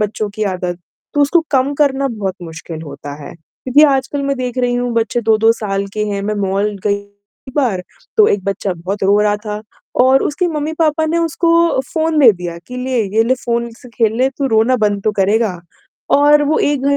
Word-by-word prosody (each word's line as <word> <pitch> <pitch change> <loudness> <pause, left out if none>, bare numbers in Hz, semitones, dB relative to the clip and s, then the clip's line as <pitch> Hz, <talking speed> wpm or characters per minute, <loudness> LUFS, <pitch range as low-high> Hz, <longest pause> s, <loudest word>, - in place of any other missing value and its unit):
बच्चों 210 0 -2
की 215 - -3
आदत, 180 -2 -3 0.4
तो 290 - +2
उसको 285 +4 +4
कम 270 0 +2
करना 275 -1 +1
बहुत 205 -6 -3
मुश्किल 165 -1 -8
होता 145 -1 -8
है 140 - -9
क्योंकि 255 - 0
आजकल 270 +2 -1
मैं 275 0 -1
देख 250 -1 -4
रही 245 -1 +1
हूँ 245 0 -1
बच्चे 230 +1 0
2-2 225 0 +3
साल 200 -3 -3
के 210 0 -1
हैं 200 -1 -2
मैं 210 +1 -2
मॉल 200 +2 0 0.2
गई 205 - +2 0.5
एक 260 - -11
बार, 230 -10 +1 0.3
तो 430 -1 +6
एक 200 -2 0
बच्चा 195 0 -2
बहुत 185 +5 -5
रो 200 +2 +4
रहा 210 0 +2
था 210 0 -4 0.4
और 260 +2 +5
उसके 325 +5 0
मम्मी-पापा 315 0 0
ने 330 +2 0
उसको 335 -1 +2
फोन 320 -1 +1
दे 265 -6 +8
दिया 175 -2 -6
कि, 250 - -8
"ले 250 -2 -1
ये 225 - +6
ले 255 +2 +2
फोन 235 0 -1
से 250 - -14
खेल 230 -2 0
ले 260 +1 +3
तू 275 - 0
रोना 225 +1 +3
बंद 205 -3 0
तो 215 - +1
करेगा।" 200 -1 +1 0.6
और 295 +1 +5
वो 300 +2 +1
एक 290 -2 0
235 Hz, 205 wpm, -16 LUFS, 205-280 Hz, 0.6 s, दे